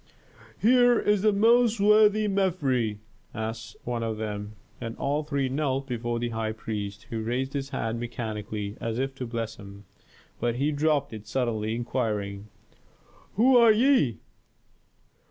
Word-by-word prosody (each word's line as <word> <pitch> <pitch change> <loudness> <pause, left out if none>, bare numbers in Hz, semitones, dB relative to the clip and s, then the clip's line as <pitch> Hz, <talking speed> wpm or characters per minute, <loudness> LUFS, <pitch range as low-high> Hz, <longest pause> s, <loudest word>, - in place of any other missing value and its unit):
"Here 245 +1 +5
is 210 -2 +2
the 215 +1 +4
most 230 +2 +4
worthy 210 +1 +5
Mefres," 145 - 0 0.4
said 110 +1 -3 0.3
one 120 -1 -3
of 110 -1 -2
them. 105 -1 -5 0.3
And 115 -1 -5
all 145 +2 -1
three 140 -3 -1
knelt 135 0 -1
before 120 -2 -3
the 120 0 -2
high 110 -1 -2
priest, 105 -1 -5
who 115 -1 -2
raised 125 +4 -2
his 140 -1 -3
hand 115 -3 -3
mechanically, 110 -3 -5
as 115 0 -2
if 135 +1 -1
to 130 -2 -6
bless 115 -1 -4
them. 100 0 -12 0.5
But 120 -1 0
he 140 +4 +1
dropped 145 -3 +1
it 110 -1 -9
suddenly, 115 -4 -1
inquiring, 105 -4 -2 0.9
"Who 250 +5 +5
are 235 -2 +7
ye?" 225 - +3
120 Hz, 145 wpm, -27 LUFS, 110-155 Hz, 0.9 s, are